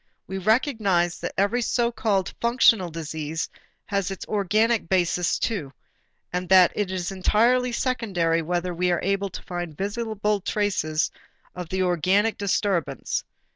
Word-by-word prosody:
We 190 Hz, 0 st, -5 dB
recognized 200 Hz, -, +1 dB
that -, -, -4 dB
every 205 Hz, +5 st, +2 dB
so 235 Hz, 0 st, +1 dB
called 205 Hz, -5 st, 0 dB
functional 235 Hz, -6 st, +4 dB
disease 160 Hz, -1 st, -4 dB, 0.4 s
has 200 Hz, -2 st, -1 dB
its 195 Hz, -, -6 dB
organic 215 Hz, 0 st, +1 dB
basis 180 Hz, -1 st, +1 dB
too, 165 Hz, -, -3 dB, 0.6 s
and 180 Hz, 0 st, -2 dB
that 185 Hz, -2 st, +7 dB
it 205 Hz, -3 st, -1 dB
is 185 Hz, -1 st, -3 dB
entirely 235 Hz, +6 st, +2 dB
secondary 195 Hz, -10 st, 0 dB
whether 175 Hz, +2 st, -2 dB
we 180 Hz, +1 st, 0 dB
are 175 Hz, -2 st, 0 dB
able 195 Hz, +1 st, 0 dB
to -, -, -9 dB
find 175 Hz, -4 st, -5 dB
visible 210 Hz, 0 st, -1 dB
traces 180 Hz, -7 st, 0 dB, 0.4 s
of 180 Hz, -2 st, -7 dB
the 190 Hz, 0 st, 0 dB
organic 185 Hz, +5 st, +2 dB
disturbance. 190 Hz, -7 st, -1 dB
190 Hz, 135 wpm, -24 LUFS, 175-215 Hz, 0.6 s, that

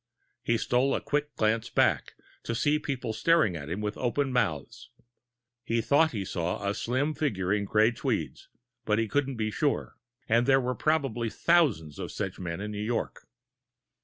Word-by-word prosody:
He 115 Hz, -, +1 dB
stole 125 Hz, +4 st, +1 dB
a -, -, 0 dB
quick 150 Hz, 0 st, -2 dB
glance 110 Hz, +1 st, +1 dB
back, -, -, +1 dB, 0.3 s
to 115 Hz, -, -2 dB
see 150 Hz, +5 st, +2 dB
people 130 Hz, -6 st, -3 dB
staring 155 Hz, -, +3 dB
at 75 Hz, -2 st, -6 dB
him 95 Hz, +5 st, -3 dB
with 105 Hz, 0 st, -3 dB
open 130 Hz, +2 st, 0 dB
mouths. 95 Hz, -, -2 dB, 0.7 s
He 115 Hz, -1 st, 0 dB
thought 145 Hz, +7 st, +4 dB
he 100 Hz, -4 st, -3 dB
saw 90 Hz, +3 st, -2 dB
a 100 Hz, -, +1 dB
slim 130 Hz, +8 st, -1 dB
figure 100 Hz, -12 st, -1 dB
in 105 Hz, -1 st, 0 dB
gray 110 Hz, +3 st, +3 dB
tweeds, 120 Hz, -, -3 dB, 0.4 s
but 105 Hz, -, +1 dB
he 115 Hz, 0 st, +1 dB
couldn't 135 Hz, +2 st, -1 dB
be 110 Hz, -1 st, -1 dB
sure 145 Hz, +5 st, -1 dB, 0.3 s
and 115 Hz, +2 st, +3 dB
there 135 Hz, 0 st, +5 dB
were 125 Hz, -1 st, -1 dB
probably 135 Hz, -7 st, 0 dB
thousands 100 Hz, -, +2 dB
of -, -, -5 dB
such -, -, -4 dB
men 85 Hz, -1 st, -4 dB
in 105 Hz, +1 st, -4 dB
New 105 Hz, 0 st, -4 dB
York. 115 Hz, +2 st, -3 dB
115 Hz, 175 wpm, -28 LUFS, 105-135 Hz, 0.7 s, there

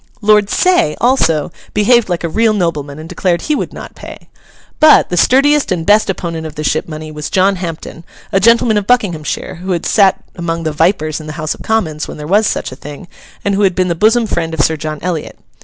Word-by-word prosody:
Lord 210 Hz, -1 st, +3 dB
Say, 360 Hz, -, +2 dB
also, 165 Hz, -, +1 dB, 0.2 s
behaved 215 Hz, +1 st, +3 dB
like 175 Hz, -1 st, -2 dB
a -, -, 0 dB
real 220 Hz, +6 st, +1 dB
nobleman, 150 Hz, -7 st, -2 dB
and 155 Hz, +1 st, -9 dB
declared 175 Hz, 0 st, -1 dB
he 305 Hz, -, 0 dB
would -, -, -3 dB
not -, -, -10 dB
pay. -, -, -12 dB, 0.5 s
But, 310 Hz, -1 st, +6 dB
the 180 Hz, -, -2 dB
sturdiest 275 Hz, -, +3 dB
and 170 Hz, -3 st, -1 dB
best 210 Hz, +2 st, +3 dB
opponent 165 Hz, -4 st, -4 dB
of 155 Hz, -, -11 dB
the 155 Hz, -, -5 dB
ship 155 Hz, +1 st, -1 dB
money 155 Hz, 0 st, -7 dB
was 150 Hz, -1 st, -6 dB
John 190 Hz, +1 st, +2 dB
Hampden, 165 Hz, -2 st, -7 dB, 0.3 s
a 195 Hz, -, +2 dB
gentleman 230 Hz, 0 st, +4 dB
of 200 Hz, -, -8 dB
Buckinghamshire, 180 Hz, -10 st, -1 dB
who 185 Hz, 0 st, -2 dB
had 170 Hz, -, -3 dB
sat 195 Hz, -3 st, +3 dB
among 170 Hz, -1 st, -3 dB
the 155 Hz, -, -1 dB
'vipers' 155 Hz, -1 st, 0 dB
in 155 Hz, -, -10 dB
the 155 Hz, -, -6 dB
House 155 Hz, -1 st, -2 dB
of -, -, -14 dB
Commons 160 Hz, -9 st, -1 dB
when -, -, -8 dB
there 150 Hz, -, -7 dB
was 205 Hz, +6 st, +2 dB
such -, -, -3 dB
a -, -, -8 dB
thing, 145 Hz, +5 st, -10 dB, 0.4 s
and 200 Hz, -, +1 dB
who 200 Hz, -, 0 dB
had 190 Hz, -3 st, +2 dB
been 185 Hz, -1 st, 0 dB
the -, -, +1 dB
bosom 225 Hz, +7 st, +2 dB
friend 165 Hz, -5 st, -2 dB
of 150 Hz, -, 0 dB
Sir 160 Hz, -, +2 dB
John 155 Hz, 0 st, -5 dB
Eliot. 170 Hz, -4 st, -4 dB
175 Hz, 225 wpm, -14 LUFS, 155-210 Hz, 0.5 s, But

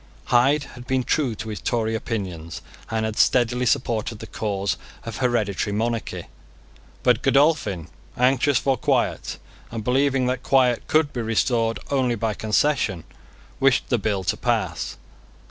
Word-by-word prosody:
Hyde 135 Hz, +5 st, +4 dB
had 120 Hz, 0 st, -11 dB
been 130 Hz, -1 st, +1 dB
true 130 Hz, -3 st, 0 dB
to 110 Hz, -, -6 dB
his 105 Hz, -6 st, -5 dB
Tory 110 Hz, +5 st, 0 dB
opinions, 90 Hz, -8 st, -4 dB, 0.3 s
and 110 Hz, -1 st, -1 dB
had 110 Hz, -1 st, -3 dB
steadily 125 Hz, 0 st, +3 dB
supported 115 Hz, -1 st, 0 dB
the -, -, -8 dB
cause 100 Hz, -3 st, -2 dB, 0.3 s
of 115 Hz, -3 st, -6 dB
hereditary 110 Hz, -7 st, 0 dB
monarchy. 115 Hz, +2 st, -2 dB, 0.8 s
But -, -, +3 dB
Godolphin, 135 Hz, -, +2 dB, 0.3 s
anxious 130 Hz, +2 st, +3 dB
for 135 Hz, +1 st, +1 dB
quiet, -, -, 0 dB, 0.3 s
and 115 Hz, -2 st, -5 dB
believing 135 Hz, +2 st, +2 dB
that 125 Hz, 0 st, -1 dB
quiet 130 Hz, -3 st, +2 dB
could 155 Hz, -2 st, +2 dB
be 120 Hz, -, -2 dB
restored 115 Hz, 0 st, +1 dB
only 130 Hz, -4 st, +2 dB
by 110 Hz, 0 st, -1 dB
concession, 110 Hz, -, +1 dB, 0.6 s
wished 135 Hz, -1 st, +3 dB
the 120 Hz, -, +2 dB
bill 100 Hz, -2 st, -1 dB
to -, -, 0 dB
pass. -, -, -1 dB
120 Hz, 145 wpm, -23 LUFS, 110-130 Hz, 0.8 s, Hyde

